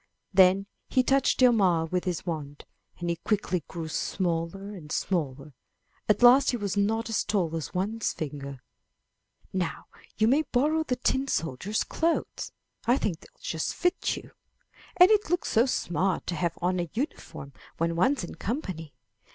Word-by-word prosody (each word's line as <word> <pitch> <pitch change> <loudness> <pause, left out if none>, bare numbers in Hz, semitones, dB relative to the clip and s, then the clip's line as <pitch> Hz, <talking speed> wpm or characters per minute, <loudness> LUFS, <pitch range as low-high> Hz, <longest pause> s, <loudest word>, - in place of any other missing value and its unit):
Then 190 +1 +5 0.2
he 255 - +3
touched 270 +1 +2
Hjalmar 190 -10 +4
with 180 0 0
his 180 -3 -2
wand, 150 -4 -5 0.3
and 175 - -4
he 170 0 0
quickly 185 -5 -1
grew 165 -3 -5
smaller 175 +4 -2
and 155 -7 -10
smaller; 150 -6 -2 0.6
at 210 +3 +3
last 260 +3 +8
he 245 - +1
was 205 -3 -2
not 220 +3 +1
as 225 - 0
tall 175 -6 0
as 160 +2 -5
one's 210 +4 -1
finger. 140 -3 -6 0.9
"Now 185 -3 -2 0.3
you 220 - +3
may 275 +6 +4
borrow 300 +3 +1
the 260 -5 -1
tin 265 +2 0
soldier's 165 - -1
clothes; 330 0 -1 0.4
I 245 +2 +5
think 175 - -2
they'll - - -20
just 160 -1 -2
fit 355 +1 0
you, - - -11 0.7
and 365 +3 +8
it 420 -5 +3
looks 355 +1 0
so 230 +4 +4
smart 185 -5 0
to 175 - -2
have 170 0 -1
on 180 0 +1
a 175 -2 -2
uniform 225 - -5 0.2
when 165 0 0
one's 250 +8 +2
in 175 - -6
company." 185 - -4
190 Hz, 160 wpm, -27 LUFS, 165-245 Hz, 0.9 s, last